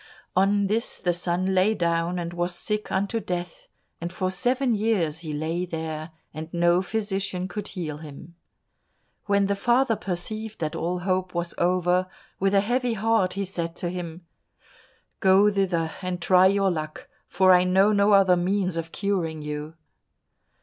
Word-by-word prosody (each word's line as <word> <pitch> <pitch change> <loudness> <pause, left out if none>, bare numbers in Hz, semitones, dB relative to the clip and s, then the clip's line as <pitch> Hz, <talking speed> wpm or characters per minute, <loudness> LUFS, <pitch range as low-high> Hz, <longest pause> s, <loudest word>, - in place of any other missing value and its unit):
On 200 +2 +3
this 215 +4 0
the 175 -1 0
son 180 +2 0
lay 190 +4 +3
down 170 0 0
and 170 -1 -4
was 175 0 -2
sick 210 +3 -3
unto 200 +4 0
death, 175 -4 -5 0.3
and 170 +1 -4
for 185 0 -2
seven 250 +6 +1
years 200 -8 0
he 160 -2 -6
lay 160 +4 -2
there, 160 -2 -5 0.2
and 160 +1 -7
no 175 +1 +3
physician 195 -2 -2
could 210 +1 -5
heal 155 -6 -5
him. 155 +2 -11 0.9
When 200 -1 +3
the 200 0 0
father 240 +3 +2
perceived 215 +4 -4
that 160 0 -3
all 175 +2 -2
hope 185 -1 -1
was 170 0 -2
over, 180 +1 +2 0.3
with 195 +1 +2
a 195 - +5
heavy 245 +3 0
heart 220 -3 +1
he 200 0 -2
said 170 -3 -4
to 175 - -3
him, 175 -1 -7 0.9
"Go 195 +2 +5
thither, 180 -5 0
and 185 -1 -3
try 185 +1 +5
your 195 0 +2
luck, 155 -2 -5 0.2
for 185 +1 +4
I 180 0 +5
know 190 +3 +4
no 205 0 +4
other 190 -2 +6
means 185 0 0
of 165 0 -4
curing 170 -6 -2
you." 150 +1 -5
185 Hz, 165 wpm, -25 LUFS, 170-200 Hz, 0.9 s, other